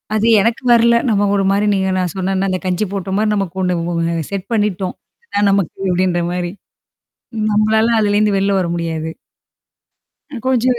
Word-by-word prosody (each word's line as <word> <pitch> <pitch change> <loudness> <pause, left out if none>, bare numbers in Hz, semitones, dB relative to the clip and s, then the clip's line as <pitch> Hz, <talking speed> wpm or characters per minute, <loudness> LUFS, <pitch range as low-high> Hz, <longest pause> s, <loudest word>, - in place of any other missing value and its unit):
அது 215 - +1 0.2
எனக்கு 230 +3 0
வரல. 235 0 +5
நம்ம 205 -1 +2
ஒருமாரி 195 +1 +1
நீங்க 190 -1 0
நான் 180 -3 -2
சொன்னன்னா, 190 +1 -1
அந்த 185 -1 -1
கஞ்சி 185 +3 0
போட்டமாரி 195 +3 -1
நமக்கு 190 -2 -3
ஒண்ணு 180 -1 0
வ - - -2 0.3
அ - - -10
செட் 200 -1 -4
பண்ணிட்டோம். 200 -4 -1 0.3
இதான் 205 - +1
நமக்கு 195 -4 0
அப்பிடின்ற 180 -1 +1
மாரி. 175 -1 -3 1.0
நம்மளால 220 +2 +2
அதுலேருந்து 205 -1 +2
வெளில 195 0 +1
வர 175 - -1
முடியாது. 160 -1 -3 1.2
அ - - -6
கொஞ்ச 255 -3 +1
195 Hz, 155 wpm, -17 LUFS, 180-210 Hz, 1.2 s, வரல